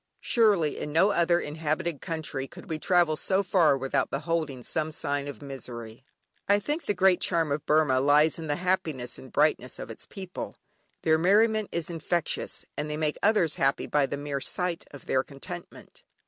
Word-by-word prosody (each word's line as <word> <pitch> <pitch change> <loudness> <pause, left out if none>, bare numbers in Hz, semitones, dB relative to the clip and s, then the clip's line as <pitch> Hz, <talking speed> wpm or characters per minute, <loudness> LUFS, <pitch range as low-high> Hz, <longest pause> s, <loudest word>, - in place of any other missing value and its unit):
Surely 205 - +3
in 150 - -4
no 180 +7 +4
other 170 -2 +3
inhabited 155 0 -2
country 155 -5 -3
could - - -13
we 160 -2 -3
travel 175 -2 +3
so 190 +5 +1
far 175 -7 +4
without 135 0 0
beholding 145 -3 -2
some 155 +4 -2
sign 145 -1 -2
of 145 0 -8
misery. 120 -4 -8 0.5
I 200 - +6
think 295 +10 -3
the 205 - +1
great 185 0 +4
charm 165 -4 +1
of 145 +1 -2
Burmah 150 -4 +3
lies 150 +3 +4
in 160 - -5
the 145 - 0
happiness 170 -8 -1
and 130 - -12
brightness 130 -5 +1
of - - -7
its 110 - -9
people; 190 -2 -7 0.5
their 160 -1 +4
merriment 215 +4 +3
is 170 -2 -2
infectious, 170 0 -2
and 150 - -3
they 150 - -3
make 155 -1 -1
others 200 -7 +3
happy 135 0 +1
by 145 -2 +2
the 140 - -4
mere 145 -1 -3
sight 180 +2 -1
of 145 - -12
their 130 - +2
contentment. 170 +6 -10
155 Hz, 180 wpm, -27 LUFS, 140-180 Hz, 0.5 s, I